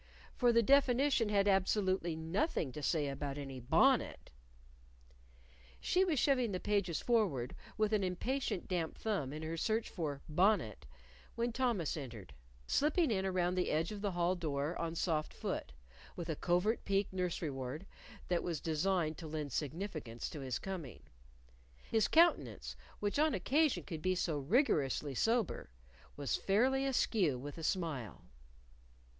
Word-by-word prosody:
For 245 Hz, -1 st, +4 dB
the 235 Hz, 0 st, +4 dB
definition 270 Hz, -2 st, +4 dB
had 200 Hz, -1 st, +3 dB
absolutely 190 Hz, -3 st, +2 dB
nothing 160 Hz, -, -1 dB
to 150 Hz, -, -7 dB
say 150 Hz, 0 st, +1 dB
about 140 Hz, 0 st, -4 dB
any 135 Hz, -2 st, -6 dB
bonnet. 120 Hz, -, +2 dB, 1.5 s
She 365 Hz, +1 st, +2 dB
was 340 Hz, -6 st, +1 dB
shoving 255 Hz, -6 st, +2 dB
the 185 Hz, -, -1 dB
pages 200 Hz, -6 st, 0 dB
forward 185 Hz, -, +1 dB, 0.2 s
with 215 Hz, 0 st, +1 dB
an 210 Hz, -2 st, +2 dB
impatient 190 Hz, +4 st, -2 dB
damp 170 Hz, -3 st, -2 dB
thumb 195 Hz, -12 st, -2 dB
in 155 Hz, +2 st, -6 dB
her 160 Hz, +1 st, -3 dB
search 220 Hz, +6 st, 0 dB
for 145 Hz, -6 st, -4 dB
Bonnet, 160 Hz, -, +1 dB, 0.5 s
when 235 Hz, +1 st, 0 dB
Thomas 235 Hz, -, 0 dB
entered, 115 Hz, -, -8 dB, 0.3 s
slipping 305 Hz, -, +2 dB
in 195 Hz, -2 st, 0 dB
around 180 Hz, -1 st, +1 dB
the 180 Hz, 0 st, 0 dB
edge 160 Hz, +4 st, 0 dB
of 205 Hz, -1 st, -6 dB
the 200 Hz, -2 st, -1 dB
hall 175 Hz, +1 st, +2 dB
door 155 Hz, -2 st, -2 dB
on 165 Hz, 0 st, -3 dB
soft 160 Hz, -3 st, 0 dB
foot -, -, -4 dB, 0.4 s
with 170 Hz, -1 st, -5 dB
a 160 Hz, -, 0 dB
covert 180 Hz, +8 st, +1 dB
peek 195 Hz, -1 st, 0 dB
nursery 180 Hz, -4 st, -2 dB
ward 135 Hz, +6 st, -5 dB, 0.4 s
that 175 Hz, -1 st, +1 dB
was 170 Hz, -4 st, -2 dB
designed 160 Hz, 0 st, 0 dB
to 165 Hz, -, -7 dB
lend 150 Hz, -2 st, -4 dB
significance 150 Hz, -, -4 dB
to 155 Hz, -, -7 dB
his 130 Hz, -2 st, -2 dB
coming. 170 Hz, -, -6 dB, 0.9 s
His 220 Hz, -1 st, +3 dB
countenance, 340 Hz, +2 st, +3 dB, 0.3 s
which 205 Hz, +6 st, 0 dB
on 310 Hz, 0 st, +3 dB
occasion 285 Hz, -, +2 dB
could 160 Hz, -4 st, -6 dB
be 185 Hz, +1 st, +1 dB
so 165 Hz, -4 st, -1 dB
rigorously 145 Hz, -, +1 dB
sober, 225 Hz, -, 0 dB, 0.5 s
was 140 Hz, -3 st, -1 dB
fairly 260 Hz, +7 st, +2 dB
askew 200 Hz, -, +2 dB
with 145 Hz, +5 st, -7 dB
a -, -, -7 dB
smile. 155 Hz, -, -2 dB
180 Hz, 150 wpm, -35 LUFS, 150-215 Hz, 1.5 s, For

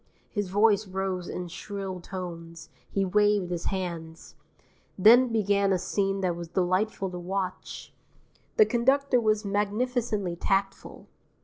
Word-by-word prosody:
His 205 Hz, -3 st, -2 dB
voice 205 Hz, +1 st, +3 dB
rose 185 Hz, -1 st, -3 dB
in 180 Hz, 0 st, -5 dB
shrill 190 Hz, +1 st, -6 dB
tones, 170 Hz, -3 st, -8 dB, 0.2 s
he 195 Hz, -1 st, 0 dB
waved 205 Hz, -1 st, +2 dB
his 175 Hz, -1 st, -3 dB
hands. 170 Hz, -4 st, -5 dB, 0.6 s
Then 235 Hz, +6 st, +7 dB
began 200 Hz, -3 st, +1 dB
a 190 Hz, -, +3 dB
scene 195 Hz, +2 st, -1 dB
that 180 Hz, -2 st, 0 dB
was 170 Hz, 0 st, -7 dB
delightful 185 Hz, +3 st, 0 dB
to 180 Hz, -, -6 dB
watch. 185 Hz, +1 st, -5 dB, 0.6 s
The 435 Hz, -, +7 dB
conductor 265 Hz, -, +2 dB
was 215 Hz, -1 st, +1 dB
magnificently 210 Hz, -1 st, -1 dB
tactful. 195 Hz, +2 st, -2 dB
195 Hz, 125 wpm, -27 LUFS, 180-210 Hz, 0.6 s, Then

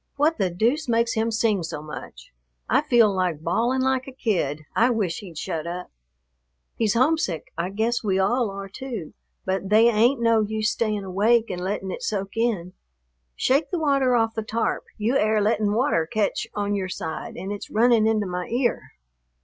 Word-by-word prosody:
What 305 Hz, +3 st, +2 dB
the 190 Hz, -2 st, +2 dB
deuce 240 Hz, -, 0 dB
makes 230 Hz, 0 st, +2 dB
him 225 Hz, +1 st, 0 dB
sing 220 Hz, -3 st, +1 dB
so 160 Hz, -2 st, -5 dB
much? 125 Hz, -, -10 dB, 0.3 s
I -, -, +3 dB
feel 240 Hz, -8 st, +4 dB
like 175 Hz, -4 st, -1 dB
bawling 240 Hz, +10 st, +1 dB
like 260 Hz, 0 st, 0 dB
a -, -, -7 dB
kid; 180 Hz, -, -1 dB
I 235 Hz, +2 st, +4 dB
wish 210 Hz, -8 st, -1 dB
he'd 180 Hz, -7 st, -11 dB
shut 160 Hz, +1 st, -3 dB
up." 180 Hz, +1 st, -6 dB, 0.8 s
"He's 220 Hz, -2 st, +1 dB
homesick; 255 Hz, -, +1 dB
I 170 Hz, +2 st, -2 dB
guess 225 Hz, +5 st, -1 dB
we 195 Hz, -3 st, +1 dB
all 225 Hz, +4 st, +2 dB
are 195 Hz, 0 st, -6 dB
too, 220 Hz, -, -7 dB, 0.3 s
but 190 Hz, 0 st, -2 dB
they 220 Hz, +3 st, +6 dB
ain't 235 Hz, +4 st, +3 dB
no 230 Hz, -1 st, +3 dB
use 215 Hz, 0 st, 0 dB
staying 215 Hz, -3 st, -1 dB
awake 215 Hz, +4 st, +2 dB
and 180 Hz, -1 st, -4 dB
letting 190 Hz, 0 st, -3 dB
it -, -, -6 dB
soak 195 Hz, -1 st, -3 dB
in. 215 Hz, -6 st, -1 dB, 0.6 s
Shake 280 Hz, +2 st, +1 dB
the 360 Hz, -, -1 dB
water 275 Hz, -5 st, +2 dB
off 225 Hz, -1 st, +2 dB
the 220 Hz, -, -2 dB
tarp, 225 Hz, +1 st, -2 dB
you 230 Hz, +5 st, +1 dB
air 215 Hz, -1 st, +2 dB
lettin' 210 Hz, 0 st, +1 dB
water 215 Hz, -, +1 dB
catch 215 Hz, -2 st, 0 dB
on 205 Hz, 0 st, -1 dB
your 190 Hz, -2 st, -2 dB
side 160 Hz, -3 st, -5 dB
an' 195 Hz, -, -5 dB
it's 205 Hz, -, -6 dB
running 225 Hz, 0 st, +4 dB
into 215 Hz, -2 st, +1 dB
my 180 Hz, -1 st, -4 dB
ear." 240 Hz, +1 st, -1 dB
215 Hz, 185 wpm, -24 LUFS, 190-235 Hz, 0.8 s, they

